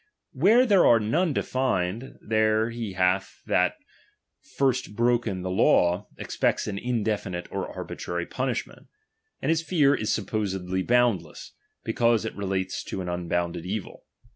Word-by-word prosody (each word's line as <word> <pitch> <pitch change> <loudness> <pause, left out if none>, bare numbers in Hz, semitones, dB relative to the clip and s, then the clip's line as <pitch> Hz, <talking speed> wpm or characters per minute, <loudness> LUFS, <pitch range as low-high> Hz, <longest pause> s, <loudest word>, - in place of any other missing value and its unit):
Where 210 - +5
there 200 -6 +5
are 115 - +6
"One 155 - +1
defined, 125 -4 -1
there 110 +1 +2
he 115 -5 -5
that - - -13
hath 95 +1 +1 0.7
first 130 -6 -1
broken 120 -5 +1
the 95 - -3
^^■w, 90 -1 +3
expects - - -1
an 100 -1 -4
indefinite 105 -7 -2
or - - -3
arbitrary 85 0 -5
punishment; - - -4 0.6
''■tid 135 - 0
his 165 0 +2
fear 155 -5 +3
is 110 -6 -1
supposed 95 -4 -2
boundless, 120 -5 +1 0.3
because 115 -2 +2
it 110 - -5
re 100 - -4
lates 95 0 -2
to 95 - -4
an 90 - -4
unbounded 85 -1 -2
evil. 100 +1 -5
110 Hz, 140 wpm, -26 LUFS, 95-120 Hz, 0.7 s, are